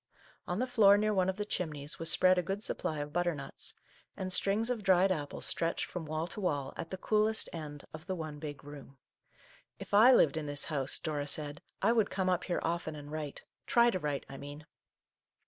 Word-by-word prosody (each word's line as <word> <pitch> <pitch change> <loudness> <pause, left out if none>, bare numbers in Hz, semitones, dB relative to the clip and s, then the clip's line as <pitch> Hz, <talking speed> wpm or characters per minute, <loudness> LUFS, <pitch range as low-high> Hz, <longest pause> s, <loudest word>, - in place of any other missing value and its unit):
On 180 - -2
the 250 - +1
floor, 215 -5 +6
near 215 +1 +1
one 190 -2 +2
of 190 - -1
the 210 +1 -3
chimneys, 150 -7 -4
was 165 0 +1
spread 185 0 +5
a - - +2
good 195 +4 -4
supply 155 - -3
of 145 0 -6
butternuts, 170 -5 -2 0.4
and 185 -1 -2
strings 205 +6 +2
of 235 -3 -2
dried 190 -1 +4
apples 145 -5 -3
stretched 165 0 0
from 175 -3 -6
wall 155 +1 -2
to 205 - -7
wall 145 -7 -1
at 165 - -6
the 190 - -5
coolest 215 +3 +2
end 150 -3 -7
of 155 +3 -10
the 190 - -2
one 155 -3 -6
big 145 -2 -7
room. 140 -1 -11 0.4
" - - -26 0.3
If - - -10
I 220 +5 +8
lived 160 - +5
in 155 -2 -3
this 145 -1 0
house/' 140 -4 +1
Dora 150 -3 -3
said, 145 0 -2
" - - -47
I 215 - +5
would 225 -3 +2
come 190 -1 0
up 180 - 0
here 175 - -1
often 165 -1 -2
and 145 0 -9
write, 150 -2 -5
— - - -50
try 235 0 +5
to 185 - -2
write, 145 -4 -3
I 135 - -9
mean 145 +2 -9
165 Hz, 225 wpm, -32 LUFS, 145-195 Hz, 0.4 s, I